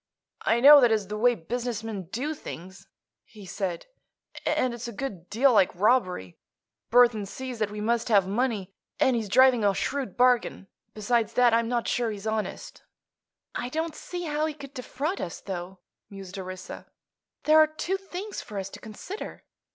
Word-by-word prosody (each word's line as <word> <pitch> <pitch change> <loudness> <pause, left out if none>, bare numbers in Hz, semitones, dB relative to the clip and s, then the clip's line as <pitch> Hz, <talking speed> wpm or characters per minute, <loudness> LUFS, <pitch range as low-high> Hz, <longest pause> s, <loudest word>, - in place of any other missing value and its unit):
"I 235 +1 +2
know 285 +2 +10
that 240 -2 +5
is 210 -3 0
the 210 - -3
way 245 +2 +4
business 230 +5 -4
men 210 -5 -5
do 285 +7 -2
things," 190 - -10 0.4
he 210 -3 -14
said, 185 -2 -4 0.6
"and 255 -1 +1
it's 235 0 -6
a - - -5
good 200 -7 -6
deal 255 +4 +4
like 195 -4 +5
robbery. 185 - +1 0.5
Burthon 235 -3 +4
sees 255 +2 -7
that 215 -2 0
we 210 0 -6
must 230 +2 0
have 200 -4 +4
money, 205 -3 -1 0.3
and 265 -4 +3
he's 220 -3 -2
driving 255 0 +5
a 200 -1 +3
shrewd 270 -9 -3
bargain. 245 -5 +2 0.3
Besides 225 +1 0
that, 245 -2 +4
I'm 230 0 +2
not 240 -1 -1
sure 240 -2 0
he's 210 -1 -7
honest." 220 -1 -4 0.7
"I 245 - -3
don't 320 +3 -2
see 355 -1 -6
how 305 -1 -1
he 310 - -5
could 280 -2 -11
defraud 280 +7 -3
us, 170 - -5
though," 185 -1 -6 0.3
mused 195 -1 -9
Orissa. 185 0 -8 0.6
"There 310 +1 +6
are 310 - +7
two 325 +5 -3
things 390 +1 -7
for 210 - -9
us 195 0 -4
to - - -11
consider. 230 - -8
230 Hz, 175 wpm, -27 LUFS, 200-260 Hz, 0.7 s, know